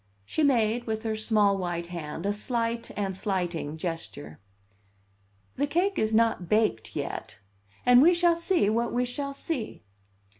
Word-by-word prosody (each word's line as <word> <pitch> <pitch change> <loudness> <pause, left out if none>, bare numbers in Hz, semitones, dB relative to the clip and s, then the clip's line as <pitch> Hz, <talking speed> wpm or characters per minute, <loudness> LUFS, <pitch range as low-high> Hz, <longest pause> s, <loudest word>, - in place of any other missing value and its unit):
She 315 - -2
made, 240 -4 +2
with 220 0 -2
her 220 -1 -1
small 210 -2 +2
white 175 -2 -3
hand, 165 +1 -5
a 200 - +1
slight 230 +2 -2
and 195 -2 -1
slighting 175 -6 -2
gesture. 160 - -5 1.2
"The 285 +2 +1
cake 365 +6 +1
is 220 - +1
not 220 -6 +2
baked 210 - +1
yet, - - -5 0.5
and 245 0 +7
we 345 +4 +6
shall 345 -1 +4
see 335 - +1
what 230 +2 0
we 245 +1 +1
shall 280 +3 -4
see." 265 - -4
220 Hz, 150 wpm, -27 LUFS, 185-250 Hz, 1.2 s, and